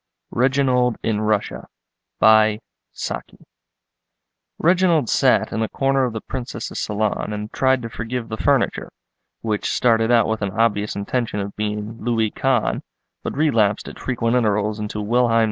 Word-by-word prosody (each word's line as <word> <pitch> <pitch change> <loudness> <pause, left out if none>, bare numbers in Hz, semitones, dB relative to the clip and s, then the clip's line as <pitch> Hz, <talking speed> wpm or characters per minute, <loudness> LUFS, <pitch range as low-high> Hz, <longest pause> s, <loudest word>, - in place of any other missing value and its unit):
REGINALD 125 -2 +2
IN 110 -1 0
RUSSIA 105 -1 -1 2.9
Reginald 170 -6 +3
sat - - +3
in 110 - -1
a 110 - -1
corner 135 -1 +1
of 120 - -3
the 110 - -4
Princess's 125 -2 -5
salon 105 0 -1
and 105 +1 -5
tried 130 -2 +2
to 115 - -5
forgive 115 +1 -4
the 110 - -4
furniture, - - 0 0.5
which 110 -2 -1
started 115 -2 +2
out 120 -1 +5
with 110 -1 -2
an 100 +2 -3
obvious 105 -2 +1
intention 105 +2 -2
of 100 0 -5
being 105 +1 -4
Louis 115 -3 +1
Quinze, - - 0 0.4
but - - -5
relapsed 115 -9 +2
at - - -9
frequent 120 -2 -1
intervals 105 -2 +1
into 105 0 -4
Wilhelm 120 +2 +2
II. - - +5
115 Hz, 145 wpm, -21 LUFS, 105-125 Hz, 2.9 s, out